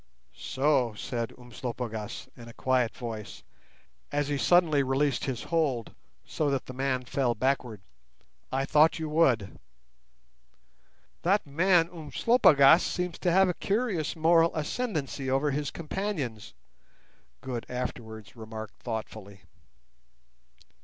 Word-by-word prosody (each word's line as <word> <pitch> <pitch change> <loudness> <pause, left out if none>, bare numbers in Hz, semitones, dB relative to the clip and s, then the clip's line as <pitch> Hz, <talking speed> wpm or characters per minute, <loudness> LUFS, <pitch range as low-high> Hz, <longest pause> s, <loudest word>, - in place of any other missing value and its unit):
"So!" 130 -5 0
said 115 +1 -4
Umslopogaas, 120 -3 -6
in 120 -1 -12
a 115 - -11
quiet 130 -3 +1
voice, 110 -3 -7 0.7
as 145 0 0
he 145 - 0
suddenly 155 +2 +4
released 135 0 0
his 130 -3 -3
hold, 145 -9 -1 0.3
so 150 -2 -1
that 135 -2 -1
the 130 - -8
man 130 -1 -1
fell 125 -1 0
backward. 125 -4 -1 0.7
"I 135 +1 0
thought 155 +4 +4
you 160 -1 -3
would." 130 -11 +2 1.6
"That 200 +4 +2
man 165 +3 +3
Umslopogaas 165 - +5
seems 180 -1 -3
to 175 - +1
have 190 +2 +5
a 180 - 0
curious 200 -6 -1
moral 165 +1 +4
ascendency 155 - -3
over 135 +3 +1
his 145 +1 -2
companions," 155 - -4 0.9
Good 125 -3 -5
afterwards 110 -5 -6
remarked 110 -1 -9
thoughtfully. 110 -4 -6
135 Hz, 115 wpm, -28 LUFS, 120-160 Hz, 1.6 s, Umslopogaas